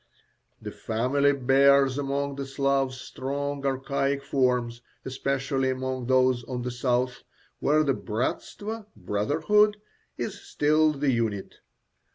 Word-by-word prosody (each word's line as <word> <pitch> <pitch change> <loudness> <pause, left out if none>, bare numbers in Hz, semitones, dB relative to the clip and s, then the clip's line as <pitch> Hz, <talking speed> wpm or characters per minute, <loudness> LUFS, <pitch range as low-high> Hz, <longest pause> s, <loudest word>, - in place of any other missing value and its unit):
The - - -7
family 130 +6 +1
bears 135 0 +4
among 140 0 -1
the 140 -1 -4
Slavs 135 -1 0
strong 140 +1 -4
archaic 140 +1 -1
forms, 125 -3 0 0.2
especially 135 0 -1
among 130 -1 -3
those 130 -1 +3
of 125 -2 -4
the 125 - -3
south, 125 0 -1 0.4
where 155 +2 +3
the 140 -2 +2
bratstvo 205 - -4
(brotherhood) 155 - +2 0.4
is - - -4
still 155 +1 +2
the 140 -1 0
unit. 110 -5 -2
135 Hz, 115 wpm, -26 LUFS, 125-140 Hz, 0.4 s, bears